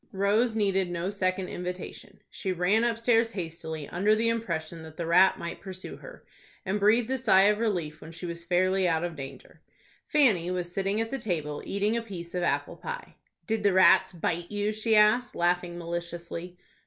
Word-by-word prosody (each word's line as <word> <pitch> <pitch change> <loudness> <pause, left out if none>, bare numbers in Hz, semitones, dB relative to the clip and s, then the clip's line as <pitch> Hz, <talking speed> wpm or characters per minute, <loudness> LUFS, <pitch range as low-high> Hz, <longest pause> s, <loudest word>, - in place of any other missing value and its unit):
Rose 210 +4 +2
needed 195 -4 +1
no 175 +2 -2
second 185 -2 -1
invitation. 180 +1 -7
She 190 -2 -3
ran 180 +6 +2
upstairs 230 0 +2
hastily, 160 -6 -5
under 205 +5 +2
the 230 +1 +1
impression 170 -8 -3
that 160 -1 -12
the 170 - -3
rat 180 +3 +5
might 170 - -6
pursue 185 -1 -8
her, - - -13 0.4
and 195 +2 -1
breathed 220 +4 +3
a 265 - 0
sigh 195 -6 +5
of 210 +1 +3
relief 175 -10 -2
when 160 - -10
she 170 +2 -8
was 170 0 -5
fairly 185 +2 +2
out 165 -1 +1
of 175 -2 -3
danger. 135 -2 -10 0.5
Fanny 225 - +3
was 180 -1 -3
sitting 195 +3 -1
at 225 - -3
the 270 - -2
table, 155 -9 -2
eating 205 +3 0
a - - -1
piece 180 -6 -8
of 180 - -1
apple - - -1
pie. 485 0 -7 0.3
"Did 220 -1 -1
the 200 -2 +3
rats 185 0 +6
bite 170 0 -3
you?" 205 +1 -1
she 215 +1 +1
asked, 215 +4 +4
laughing 175 0 0
maliciously. 170 +1 -6
190 Hz, 185 wpm, -28 LUFS, 170-215 Hz, 0.5 s, rats